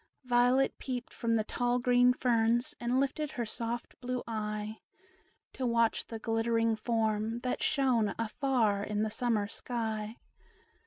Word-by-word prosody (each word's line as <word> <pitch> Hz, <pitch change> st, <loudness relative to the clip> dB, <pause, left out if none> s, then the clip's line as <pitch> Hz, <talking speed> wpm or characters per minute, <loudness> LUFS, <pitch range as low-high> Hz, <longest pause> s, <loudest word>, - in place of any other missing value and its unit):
Violet 250 Hz, +2 st, +3 dB
peeped 250 Hz, -2 st, -5 dB
from 230 Hz, -1 st, 0 dB
the 220 Hz, -, +2 dB
tall 245 Hz, +3 st, 0 dB
green 245 Hz, 0 st, +4 dB
ferns, 240 Hz, -1 st, +1 dB
And 240 Hz, +2 st, +1 dB
lifted 275 Hz, +2 st, -1 dB
her 240 Hz, -, -2 dB
soft 235 Hz, +2 st, -4 dB
blue 250 Hz, 0 st, -3 dB
eye 215 Hz, -1 st, -3 dB, 0.7 s
To 255 Hz, -, -2 dB
watch 230 Hz, -1 st, +2 dB
the 225 Hz, -, -5 dB
glittering 225 Hz, 0 st, +1 dB
form, 220 Hz, -1 st, 0 dB
that 250 Hz, -, -2 dB
shone 255 Hz, -7 st, +2 dB
Afar 225 Hz, -3 st, +1 dB
in 210 Hz, 0 st, -1 dB
the 215 Hz, -, -1 dB
summer 225 Hz, -3 st, 0 dB
sky. 220 Hz, -1 st, -4 dB
235 Hz, 140 wpm, -31 LUFS, 220-245 Hz, 0.7 s, green